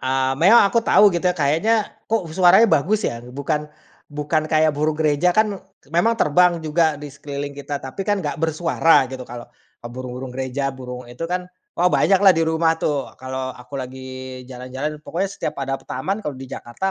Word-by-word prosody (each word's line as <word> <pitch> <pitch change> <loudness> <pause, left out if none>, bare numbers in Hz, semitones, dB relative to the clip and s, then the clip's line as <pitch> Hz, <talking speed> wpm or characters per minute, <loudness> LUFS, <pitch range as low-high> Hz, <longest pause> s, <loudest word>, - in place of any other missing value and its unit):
eee, 130 0 0
memang 200 +8 +7
aku 230 +4 +2
tau, 210 -2 +5
gitu 175 - -2
ya. 180 - -1
Kayaknya, 160 +10 +2 0.3
kok, 225 -4 +1
suaranya 180 +5 +6
bagus, 200 +9 +2
ya? 115 - -2
Bukan 140 +5 -3 0.4
bukan 150 +1 -1
kayak 155 -1 +3
burung 155 +1 +1
gereja, 155 +3 +2
kan, 215 0 +2
k - - -32
memang 175 +9 +2
terbang 175 +3 +4
juga, 155 0 +1
di 150 - -7
sekeliling 140 0 -6
kita, 145 0 -4
tapi 135 +8 -6
kan 205 -1 0
nggak 150 -2 -3
bersuara, 165 -2 +3
gitu, 130 0 -7
kalau, 120 0 -8 0.4
eee, - - -5
burung-burung 125 0 -6
gereja, 135 +1 -2
burung 125 -1 -8
itu, 120 +7 -6
kan, 180 0 -2 0.3
wah, 180 +1 +4
banyaklah 195 +2 +5
di 165 - 0
rumah, 160 0 +2
tuh, 145 -2 -1
kalau 130 0 -4
aku 125 +3 -10
lagi 130 0 -7 0.4
jalan-jalan. 130 +4 -5
Pokoknya 190 +3 -2
setiap 200 - -4
ada 135 0 -2
p 135 - -19
taman, 195 +11 -3
kalau 150 - -3
di 135 - -8
Jakarta, 120 +12 -4
150 Hz, 190 wpm, -21 LUFS, 130-175 Hz, 0.4 s, memang